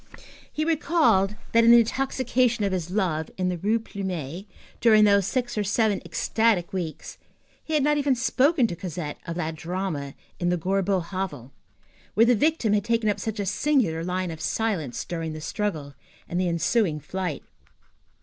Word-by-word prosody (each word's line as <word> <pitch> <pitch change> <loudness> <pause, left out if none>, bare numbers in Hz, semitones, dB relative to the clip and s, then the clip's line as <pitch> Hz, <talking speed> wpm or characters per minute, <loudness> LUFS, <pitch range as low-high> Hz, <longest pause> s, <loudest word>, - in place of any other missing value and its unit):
He 310 - -2
recalled 305 - +2 0.2
that, 230 0 +5
in 230 - +6
the 235 0 +9
intoxication 250 -2 0
of 200 - 0
his 175 -3 -2
love, 180 -6 -1
in 185 -1 0
the 180 - -2
Rue 215 +5 +1
Plumet, 190 -5 -5 0.3
during 215 -2 +6
those 200 -2 +4
six 245 -4 -2
or - - +1
seven 210 0 +1
ecstatic 220 -7 0
weeks, 170 -5 -5 0.4
he 315 - -2
had 295 - +3
not 295 +1 +2
even 280 -2 +2
spoken 260 +4 +2
to 175 - -2
Cosette 165 -4 -6
of 165 - -4
that 165 -2 -2
drama 160 -4 -4 0.2
in 175 - 0
the 180 - +1
Gorbeau 190 +2 0
hovel, 165 -9 -5 0.6
where 225 - +6
the 245 - +5
victim 250 -3 +2
had 205 -1 +2
taken 230 -1 +1
up - - -5
such 220 -1 -4
a 200 - -1
singular 200 - +1
line 180 0 -2
of 160 -1 -8
silence 175 - -2
during 165 -2 -4
the 155 - -6
struggle 155 -5 -3 0.3
and 175 +2 -1
the 180 - +1
ensuing 170 0 +1
flight. 180 +1 -4
195 Hz, 175 wpm, -25 LUFS, 170-230 Hz, 0.6 s, the